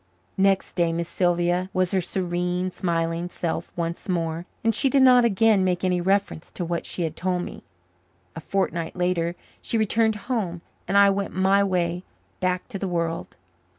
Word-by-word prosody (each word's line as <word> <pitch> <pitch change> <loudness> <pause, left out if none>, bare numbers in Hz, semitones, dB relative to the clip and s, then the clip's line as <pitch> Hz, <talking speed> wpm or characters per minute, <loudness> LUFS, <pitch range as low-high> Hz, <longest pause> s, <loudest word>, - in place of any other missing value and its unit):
Next 195 0 +2
day 170 -2 +1
Miss 170 0 -2
Sylvia 175 +1 +1
was 185 -1 +1
her 190 - +2
serene, 180 0 -2
smiling 170 -1 -1
self 170 -1 -3
once 170 +2 -4
more, 165 -1 -2 0.2
and 225 0 +3
she 270 +5 +2
did 270 0 +4
not 250 -1 +7
again 220 -2 +4
make 180 -1 0
any 180 -1 +1
reference 195 -3 0
to 175 - -4
what 170 0 -3
she 175 - -3
had 160 -1 -3
told 180 0 -1
me. - - -8 0.7
A - - -5
fortnight 170 -2 -2
later 180 -1 0 0.3
she 230 - -2
returned 220 0 +2
home 190 -9 -2 0.3
and 200 - +2
I 200 0 +7
went 195 0 -3
my 190 +2 +4
way 180 -2 0 0.4
back 180 0 -1
to 195 - -5
the 195 - -2
world. 170 0 -2
180 Hz, 175 wpm, -24 LUFS, 170-195 Hz, 0.7 s, not